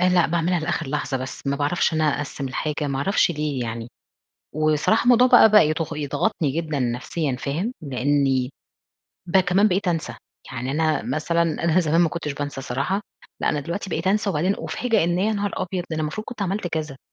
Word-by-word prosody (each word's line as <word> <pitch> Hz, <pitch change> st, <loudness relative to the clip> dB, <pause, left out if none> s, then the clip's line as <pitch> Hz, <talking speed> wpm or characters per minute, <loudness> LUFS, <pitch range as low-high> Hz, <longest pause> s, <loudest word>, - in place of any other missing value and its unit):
آآ، 180 Hz, -, +4 dB
لأ 180 Hz, -2 st, +4 dB
باعملها 170 Hz, +1 st, 0 dB
لآخر 160 Hz, 0 st, -2 dB
لحظة 145 Hz, -1 st, -2 dB
بس، 130 Hz, +2 st, -7 dB
ما 140 Hz, 0 st, 0 dB
باعرفش 145 Hz, +5 st, +1 dB
إن 155 Hz, -, +1 dB
أنا 150 Hz, -2 st, +2 dB
أقسِّم 140 Hz, -2 st, -4 dB
الحاجة 150 Hz, +2 st, -2 dB
ما 135 Hz, -1 st, -2 dB
أعرفش 185 Hz, +5 st, +2 dB
ليه 150 Hz, -4 st, -2 dB
يعني، 115 Hz, 0 st, -5 dB, 0.7 s
وصراحة 155 Hz, +8 st, +2 dB
الموضوع 245 Hz, +1 st, +6 dB
بقى 240 Hz, -3 st, +7 dB
بقى 210 Hz, -7 st, +7 dB
يض 160 Hz, 0 st, -2 dB
يضغطني 145 Hz, 0 st, -1 dB
جدًا 155 Hz, -1 st, -2 dB
نفسيًا 130 Hz, +4 st, -2 dB
فاهم؟ 170 Hz, -, -2 dB
لأني 135 Hz, -1 st, +1 dB, 0.8 s
بقى 190 Hz, +2 st, +4 dB
كمان 190 Hz, +3 st, +3 dB
بقيت 195 Hz, 0 st, 0 dB
أنسى، 165 Hz, -2 st, -1 dB, 0.4 s
يعني 125 Hz, +1 st, -4 dB
أنا 155 Hz, +1 st, +1 dB
مثلًا 170 Hz, +2 st, 0 dB, 0.2 s
أنا 170 Hz, +1 st, +3 dB
زمان 165 Hz, 0 st, +2 dB
ما 170 Hz, -, +3 dB
كُنتش 150 Hz, -4 st, -4 dB
بانسى 145 Hz, -1 st, -5 dB
الصراحة، 135 Hz, +9 st, -2 dB, 0.4 s
لأ -, -, +2 dB
أنا 150 Hz, -, 0 dB
دلوقتي 170 Hz, +7 st, -5 dB
بقيت 165 Hz, +1 st, -2 dB
أنسى، 205 Hz, +1 st, +2 dB
وبعدين 180 Hz, +3 st, +1 dB
أُفاجأ 225 Hz, -7 st, 0 dB
إن 175 Hz, +1 st, +1 dB
يا 215 Hz, +3 st, +1 dB
نهار 205 Hz, -1 st, -1 dB
أبيض! 185 Hz, -1 st, -2 dB
أنا 155 Hz, 0 st, -1 dB
المفروض 155 Hz, +8 st, -4 dB
كنت 235 Hz, -, -7 dB
عملت 195 Hz, 0 st, -1 dB
كذا، 155 Hz, -4 st, -4 dB
160 Hz, 195 wpm, -23 LUFS, 145-185 Hz, 0.8 s, بقى